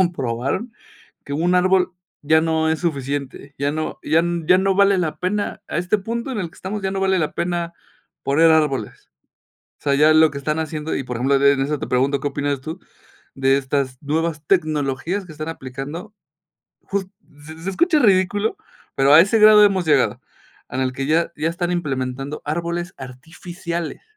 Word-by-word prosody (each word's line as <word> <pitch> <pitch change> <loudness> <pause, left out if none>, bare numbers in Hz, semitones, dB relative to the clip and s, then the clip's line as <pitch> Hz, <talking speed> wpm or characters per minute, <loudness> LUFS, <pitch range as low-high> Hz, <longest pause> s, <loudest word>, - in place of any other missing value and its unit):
comprobaron, 150 - -1 0.5
que 140 - -5
un 175 +4 +1
árbol 185 0 +3 0.3
ya 155 +2 +4
no 160 -1 +1
es 160 - 0
suficiente, 140 -3 -4
ya 140 +1 0
no 155 +1 -4
ya 160 +2 +3 0.3
ya 180 0 +6
no 195 0 +1
vale 200 0 +4
la 165 -4 -2
pena, 205 +3 -2
a - - -3
este 180 +5 +1
punto 235 +6 -4
en 225 - -3
el 175 -4 -3
que - - -22
estamos, 205 +2 -5
ya 190 - -2
no 195 - -2
vale 190 -1 +2
la 155 - -1
pena 170 -1 -2 0.5
poner 160 +4 +4
árboles. 150 -8 0 0.7
O - - -28
sea, 140 -1 +1
ya 155 +2 +5
lo 155 0 +5
que 140 - -6
están 150 +3 -2
haciendo, 155 0 -3
y 135 - -3
por 125 -1 -5
ejemplo, 135 +4 +2
en 135 - 0
en 140 -1 +4
eso 150 +2 -1
te - - -5
pregunto, 135 +2 +1
¿qué 145 - -1
opinas 145 -1 -2
tú 160 +6 -7 0.5
de 135 0 +2
estas 135 -1 -2
nuevas 155 +1 -1
tecnologías 155 +1 0
que 160 - -11
están 155 +1 -6
aplicando?, 150 - -7 0.7
jus 195 -1 -3 0.4
se 160 +1 -10
se 190 - -3
escucha 315 - +2
ridículo, 205 - +2 0.4
pero 135 +1 +4
a 155 - +10
ese 205 +4 +2
grado 215 0 +8
hemos 190 -4 +1
llegado. 130 -6 +2 0.5
En 130 - -3
el 130 -1 -1
que 135 +1 -3
ya 165 +2 +1
ya 160 - -1
están 175 +1 -2
implementando 135 -3 -3
árboles 170 +3 -3
artificiales. 165 +6 -7
160 Hz, 185 wpm, -21 LUFS, 140-185 Hz, 0.7 s, a